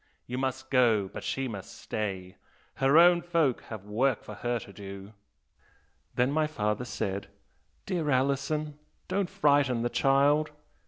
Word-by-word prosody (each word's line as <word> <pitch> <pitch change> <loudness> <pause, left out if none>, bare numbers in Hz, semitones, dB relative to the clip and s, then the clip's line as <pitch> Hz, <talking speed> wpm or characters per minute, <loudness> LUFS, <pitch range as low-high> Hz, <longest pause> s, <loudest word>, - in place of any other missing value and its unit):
You 125 +1 -4
must 130 0 -3
go, 115 -7 +3
but - - -6
she 135 0 -2
must 100 -5 -8
stay, 95 -3 -4 0.4
her 135 +3 +4
own 175 +1 +7
folk 165 -7 +1
have 110 -3 -8
work 115 +4 0
for 105 - -8
her 120 +3 -2
to 100 -3 -10
do!' 100 +1 -9 1.0
Then 125 +2 +2
my 155 +1 +2
father 105 -5 -2
said, 100 -4 -3 0.6
'Dear 165 -5 -1
Alison, 140 +3 0 0.3
don't 190 -1 -1
frighten 145 -10 +2
the 120 - 0
child!' 145 +3 +3
130 Hz, 145 wpm, -29 LUFS, 105-150 Hz, 1.0 s, own